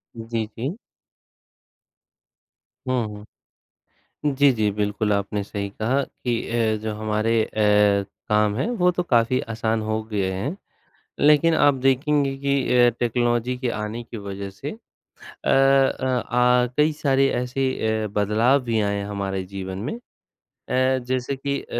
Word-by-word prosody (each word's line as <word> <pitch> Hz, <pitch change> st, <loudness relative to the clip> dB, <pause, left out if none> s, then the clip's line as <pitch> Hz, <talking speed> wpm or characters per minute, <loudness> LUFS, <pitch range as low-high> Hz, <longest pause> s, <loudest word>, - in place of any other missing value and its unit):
जी, 115 Hz, -1 st, -3 dB
जी। 140 Hz, -, -3 dB, 2.1 s
हुँ, 125 Hz, -3 st, +1 dB
हुँ। 105 Hz, 0 st, -12 dB, 0.9 s
जी, 140 Hz, 0 st, +5 dB
जी, 110 Hz, -3 st, +1 dB
बिल्कुल 105 Hz, 0 st, 0 dB
आपने 100 Hz, 0 st, -1 dB
सही 100 Hz, -1 st, -4 dB
कहा 120 Hz, +7 st, 0 dB
कि 120 Hz, -2 st, -3 dB
ए, 115 Hz, -2 st, +1 dB
जो 110 Hz, -1 st, -3 dB
हमारे 110 Hz, +1 st, -1 dB
ए, 105 Hz, -2 st, +3 dB, 0.2 s
काम 105 Hz, -1 st, +2 dB
हैं 170 Hz, -, -1 dB
वो 180 Hz, 0 st, +4 dB
तो 180 Hz, -, -1 dB
काफ़ी 125 Hz, -4 st, +2 dB
आसान 110 Hz, 0 st, -1 dB
हो 110 Hz, 0 st, -2 dB
गए 100 Hz, -4 st, -2 dB
हैं, 100 Hz, -, -3 dB, 0.6 s
लेकिन 150 Hz, +3 st, +5 dB
आप 145 Hz, -2 st, +5 dB
देखेंगे 140 Hz, +1 st, +2 dB
कि 140 Hz, 0 st, 0 dB, 0.2 s
ए, 120 Hz, 0 st, +6 dB
टेक्नोलॉजी 120 Hz, +1 st, 0 dB
के 125 Hz, -1 st, -2 dB
आने 110 Hz, +3 st, -5 dB
की 115 Hz, -, -9 dB
वजह 100 Hz, -1 st, -6 dB
से 135 Hz, +9 st, -7 dB
अ 225 Hz, -, -16 dB, 0.5 s
अ, 135 Hz, 0 st, +3 dB, 0.3 s
आ 125 Hz, 0 st, +4 dB
कई 150 Hz, +1 st, +4 dB
सारे 135 Hz, -2 st, +2 dB
ऐसे 125 Hz, +2 st, -1 dB
ए, 110 Hz, -2 st, -1 dB
बदलाव 110 Hz, +6 st, +2 dB
भी 115 Hz, -2 st, 0 dB
आए 100 Hz, 0 st, 0 dB
हैं 100 Hz, 0 st, -3 dB
हमारे 100 Hz, -2 st, -3 dB
जीवन 95 Hz, -1 st, -5 dB
में -, -, -2 dB, 0.8 s
ए, 130 Hz, +1 st, +2 dB
जैसे 130 Hz, +1 st, -1 dB
कि 140 Hz, +1 st, -2 dB
अ, -, -, -15 dB
115 Hz, 145 wpm, -23 LUFS, 105-135 Hz, 2.1 s, ए